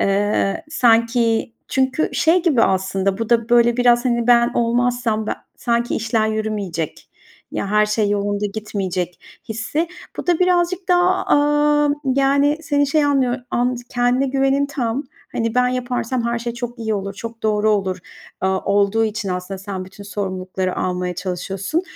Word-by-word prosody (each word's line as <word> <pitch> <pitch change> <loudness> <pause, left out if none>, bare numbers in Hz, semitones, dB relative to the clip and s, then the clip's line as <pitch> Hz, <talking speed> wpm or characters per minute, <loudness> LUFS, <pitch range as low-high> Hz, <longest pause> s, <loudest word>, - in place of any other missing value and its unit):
Eee, 200 +6 +1
sanki 230 -3 +2 0.2
çünkü 265 +3 +1
şey 335 +2 +3
gibi 285 -10 +3
aslında 190 +1 +1
bu 225 0 -3
da, 230 0 +2
böyle, 240 0 +4
biraz 245 0 +4
hani 235 -2 +1
ben 240 -1 +5
olmazsam 235 -2 0
be - - -2 0.3
sanki 235 0 0
işler 220 -1 0
yürümeyecek, 205 -7 -3 0.4
ya - - -2
her 210 0 +4
şey 210 0 +1
yolunda 205 0 0
gitmeyecek 190 -5 -3 0.3
hissi. 225 +10 -2 0.3
Bu - - -5
da 350 -2 +3
birazcık 360 0 +1
daha, 360 +1 +3
aaa, 295 0 +3 0.2
yani, 275 +2 +2
seni 285 -2 +1
şey 305 +1 +2
anlıyor 265 -3 +2
and 245 0 0
kendine 245 +2 +1
güvenin 270 +1 +1
tam. 270 -1 -2 0.3
Hani 230 0 -1
"Ben 250 0 +3
yaparsam 250 -1 -2
her 235 0 0
şey 235 0 -4
çok 240 0 -6
iyi 220 -1 -1
olur, 195 0 -4
çok 230 +2 -8
doğru 215 0 +2
olur." 190 -3 0 0.4
aaa, 190 0 +1
olduğu 205 +2 +2
için 215 -2 -3
aslında 180 +1 -4
sen 190 -1 -5
bütün 200 +2 -12
sorumlulukları 185 -2 -3
almaya 180 0 -2
çalışıyorsun. 190 - -3
230 Hz, 155 wpm, -20 LUFS, 200-260 Hz, 0.4 s, ben